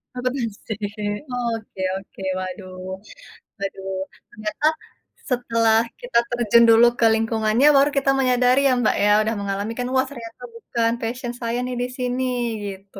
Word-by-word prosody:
Akuntansi. 250 -4 -3 0.8
Oke 215 -4 -9 0.2
oke, 195 0 -11 0.2
waduh 185 0 -6 0.9
waduh. 195 -1 -4 0.3
Ternyata 215 +8 -2 0.6
setelah 230 -3 +2 0.2
kita - - +1
terjun 235 -1 +4
dulu 230 +1 +7
ke 230 - +5
lingkungannya, 225 +3 +2
baru 275 +1 +5
kita 270 0 +3
menyadari 255 0 +3
ya 265 - +4
Mbak 215 - +2
ya, 205 - +4
sudah 225 +1 -1
mengalami 200 +2 -3
kan, 245 - -1
"Wah 260 - +4
ternyata 230 -3 -10
bukan 230 0 -1
passion 240 +2 -3
saya 235 +1 -1
nih 250 - -4
di 245 - 0
sini," 250 0 -1 0.4
gitu. 195 0 -9
230 Hz, 140 wpm, -22 LUFS, 215-250 Hz, 0.9 s, dulu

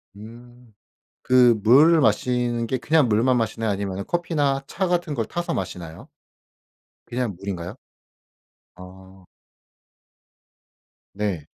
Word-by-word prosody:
음 120 +2 -14 0.5
그 125 -3 +5
물을 150 +8 +6
마시는게 120 +1 0
그냥 140 +2 +2
물만 120 +4 +2
마시나요? 115 -1 -1
아니면 100 -1 -4
커피나 145 -6 -1
차 190 0 -2
같은 175 -4 -1
걸 115 -3 -1
타서 175 +9 -4
마시나요? 90 -3 -7 1.0
그냥 120 -6 -2
물인가요? 95 0 -6 1.0
아. 95 +1 -15 1.9
네. 100 -7 -3
115 Hz, 205 characters per minute, -23 LUFS, 100-130 Hz, 1.9 s, 물을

